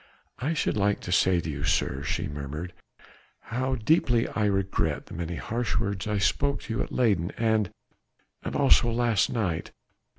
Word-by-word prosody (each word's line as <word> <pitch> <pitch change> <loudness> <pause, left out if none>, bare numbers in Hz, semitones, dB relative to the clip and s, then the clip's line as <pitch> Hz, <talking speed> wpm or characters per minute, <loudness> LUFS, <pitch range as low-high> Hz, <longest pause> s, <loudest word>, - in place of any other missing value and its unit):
"I 150 +6 -1
should 150 - 0
like 100 0 +2
to 90 - -5
say 90 -1 +4
to - - -6
you, 70 -2 -4
sir," 70 -2 +1
she 70 - -2
murmured, 75 +4 -6 0.8
"how 130 +2 0
deeply 120 -1 +2
I 105 - 0
regret 95 -1 0
the - - -12
many 85 +1 -4
harsh 115 +6 -2
words 100 -2 -2
I 105 -1 0
spoke 140 +8 +1
to 115 - -4
you 110 - 0
at - - -4
Leyden 100 -9 +2
and... 110 -4 +2 0.7
and - - -4
also 75 - +5
last 115 -3 +2
night 100 -9 -1
105 Hz, 170 wpm, -27 LUFS, 85-120 Hz, 0.8 s, also